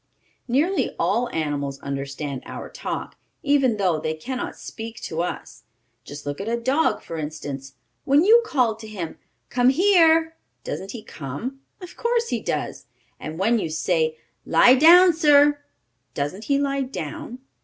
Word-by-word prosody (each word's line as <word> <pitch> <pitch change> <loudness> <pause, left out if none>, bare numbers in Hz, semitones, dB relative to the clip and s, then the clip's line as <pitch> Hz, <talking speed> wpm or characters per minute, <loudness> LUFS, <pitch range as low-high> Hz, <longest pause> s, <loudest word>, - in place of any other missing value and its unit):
Nearly 300 +10 +1
all 245 +1 +1
animals 145 -5 -3
understand 140 0 -5
our - - -8
talk, - - -5 0.3
even 275 -6 +2
though 180 -6 +1
they 155 +1 -2
can 255 +12 -5
not - - -5
speak 225 0 -8
to 160 +1 -3
us. 180 - -5 0.4
Just 145 0 -10
look 145 +4 -4
at 200 - -6
a 235 0 -1
dog, 265 +7 +1
for 165 - -6
instance. 140 -3 -6 0.3
When 285 +4 +4
you 455 +5 +7
call 250 - +1
to 220 0 -10
him: 185 -7 -6 0.3
"Come 245 0 +3
here!" 325 0 +4 0.3
doesn't 195 - -5
he 230 -3 -8
come? 170 - -6 0.2
Of 360 0 -10
course 470 0 0
he 240 - -1
does. 150 - -4 0.3
And 155 +1 -7
when 225 +5 +2
you 165 - -3
say: 160 0 0 0.3
"Lie 245 - +6
down, 345 +6 +7
sir!" 290 -2 +4 0.5
doesn't 150 +9 -3
he 280 - +2
lie 275 -1 0
down? 270 0 -6
230 Hz, 155 wpm, -23 LUFS, -, 0.5 s, you